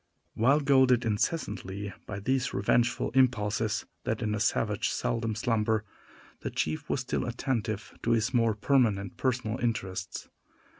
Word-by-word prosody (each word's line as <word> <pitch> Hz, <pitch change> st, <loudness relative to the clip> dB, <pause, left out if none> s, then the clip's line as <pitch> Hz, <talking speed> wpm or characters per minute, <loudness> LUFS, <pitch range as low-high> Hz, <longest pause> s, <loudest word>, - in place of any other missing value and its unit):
While 135 Hz, +7 st, +3 dB
goaded 130 Hz, -3 st, +4 dB
incessantly 105 Hz, -, -2 dB
by 100 Hz, -1 st, -4 dB
these 130 Hz, +4 st, 0 dB
revengeful 120 Hz, +4 st, +1 dB
impulses 110 Hz, -4 st, +1 dB, 0.2 s
that -, -, -2 dB
in 105 Hz, -1 st, 0 dB
a 105 Hz, -, -1 dB
savage 105 Hz, 0 st, +1 dB
seldom 115 Hz, -2 st, -1 dB
slumber, 110 Hz, -2 st, +1 dB, 0.5 s
the -, -, -4 dB
chief 80 Hz, 0 st, -2 dB
was 130 Hz, -, 0 dB
still 125 Hz, -, -2 dB
attentive 115 Hz, -3 st, -2 dB
to -, -, -2 dB
his 115 Hz, +2 st, +1 dB
more 115 Hz, -3 st, +3 dB
permanent 105 Hz, -5 st, +1 dB
personal 125 Hz, -3 st, -1 dB
interests. 95 Hz, -5 st, -3 dB
115 Hz, 135 wpm, -29 LUFS, 105-125 Hz, 0.5 s, goaded